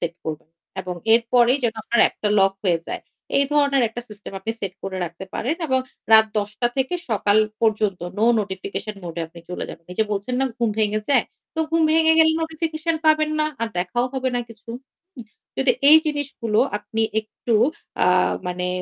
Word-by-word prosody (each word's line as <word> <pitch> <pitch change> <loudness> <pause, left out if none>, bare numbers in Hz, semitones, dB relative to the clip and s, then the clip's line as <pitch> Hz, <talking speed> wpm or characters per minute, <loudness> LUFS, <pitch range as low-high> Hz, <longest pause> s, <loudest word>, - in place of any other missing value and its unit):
Set 170 -1 -3
করবেন। 155 0 -6 0.3
এবং 180 -1 -5 0.2
এরপরেই 240 +2 +3
যেন 230 - +1
আপনার 235 +1 +1
অ্যাপটা 210 - +1
লক 195 0 +4
হয়ে 175 -3 +3
যায়। - - -5 0.4
এই 280 - +4
ধরনের 280 -3 +3
একটা 230 +2 -7
সিস্টেম 210 -2 -10
আপনি 220 - -3
সেট 195 -2 -3
করে 190 -1 -4
রাখতে 170 +2 -8
পারেন 260 +7 -1
এবং 260 -2 +2 0.3
রাত 220 0 +8
১০ঃ০০ 205 0 -2
টা 240 - +3
থেকে 265 +6 0 0.2
সকাল 205 -1 +2 0.2
পর্যন্ত 215 -4 +1 0.2
নো 225 - +3
নোটিফিকেশন 200 +2 -5
মোড 170 -1 -6
এ - - -1
আপনি 170 0 -13
চলে 180 - -4
যাবেন। 165 - -10
এইযে 220 - +1
বলছেন 205 +5 -2
না, - - +3
"ঘুম 235 -3 +1
ভেঙে 215 0 +1
যায়।" 280 - +4 0.3
তো 320 - -1
ঘুম 330 0 +2
ভেঙে 320 0 +5
গেলে 320 0 +6
নোটিফিকেশন 320 0 -2
পাবেন 310 0 +4
না। 305 - +2
আর 230 - 0
দেখাও 215 +8 0
হবে 260 -1 0
না 245 - 0
কিছু। 225 0 -16 0.5
উম 240 - -7 0.3
যদি 265 -1 +4 0.2
এই 315 - +11
জিনিসগুলো 280 -7 -2 0.2
আপনি 225 +1 -3 0.2
একটু 220 +2 -4 0.5
আ - - +3 0.4
মানে 180 0 -2
225 Hz, 190 wpm, -22 LUFS, 195-275 Hz, 0.5 s, এই